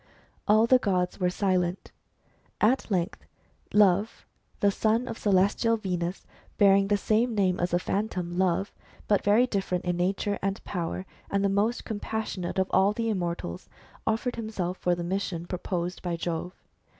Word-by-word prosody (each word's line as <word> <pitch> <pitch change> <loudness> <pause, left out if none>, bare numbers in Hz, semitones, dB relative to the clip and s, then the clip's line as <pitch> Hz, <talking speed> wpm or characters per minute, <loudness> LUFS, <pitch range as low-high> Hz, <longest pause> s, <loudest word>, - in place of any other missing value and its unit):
All 215 +2 +5
the 255 +2 +5
gods 180 -5 0
were 180 -1 +2
silent. 180 -1 -1 0.7
At 235 +5 +2
length 185 -1 -1 0.5
Love, 205 +1 +3 0.3
the 200 - +3
son 225 +4 +1
of - - -5
celestial 205 +3 +2
Venus, 180 -3 -3 0.3
bearing 195 -1 +5
the 205 0 +2
same 220 +3 +1
name 185 -3 +2
as 175 - +1
the 175 - +2
Phantom 180 -2 -2
Love, 190 +1 +1 0.3
but 205 -2 +2
very 210 +5 +5
different 190 -6 -2
in 175 0 0
nature 195 +3 0
and 195 +2 -2
power, 180 0 -3 0.2
and 200 0 +1
the - - +3
most 210 +5 0
compas 220 0 -3
sionate 180 0 -4
of 190 +2 +3
the 230 0 -1
immortals, 170 - -4 0.4
offered 230 +3 0
himself 195 -5 -3
for 175 -1 +1
the 175 - -4
mission 175 -2 -2
proposed 180 0 -3
by 175 -2 -2
Jove. 170 +2 -4
195 Hz, 155 wpm, -27 LUFS, 180-210 Hz, 0.7 s, All